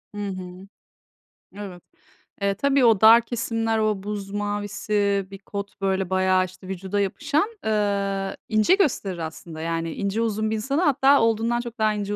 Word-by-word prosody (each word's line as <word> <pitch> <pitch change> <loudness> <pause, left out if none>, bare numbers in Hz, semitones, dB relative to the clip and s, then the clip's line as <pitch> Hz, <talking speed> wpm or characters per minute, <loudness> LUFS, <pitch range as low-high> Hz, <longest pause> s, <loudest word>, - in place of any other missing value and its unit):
Hı 205 -1 -3
hı. 185 0 -8 0.9
Evet. 190 -4 -8 0.6
E, 200 0 +2
tabii 275 +4 +2
o 225 -4 +4
dar 225 +2 +8
kesimler, 225 -1 -1
o 215 -3 0
buz 200 -1 -5
mavisi 205 -1 -1
bir 195 - -9
kot 200 0 -7
böyle 190 -1 0
bayağı, 185 0 +2
işte, 185 0 -13
vücuda 190 +2 -3
yapışan, 290 - 0 0.2
eee, 200 -2 -1
ince 215 - +4
gösterir 225 - 0
aslında 160 0 -7
yani 165 0 -2
ince, 200 +3 -2
uzun 220 -1 -1
bir 220 - 0
insanı 275 +9 -1
hatta 280 -4 +4
olduğundan 230 +1 +1
çok 235 -1 -8
daha 215 -1 +3
ince, 205 0 -3
205 Hz, 160 wpm, -24 LUFS, 195-225 Hz, 0.9 s, dar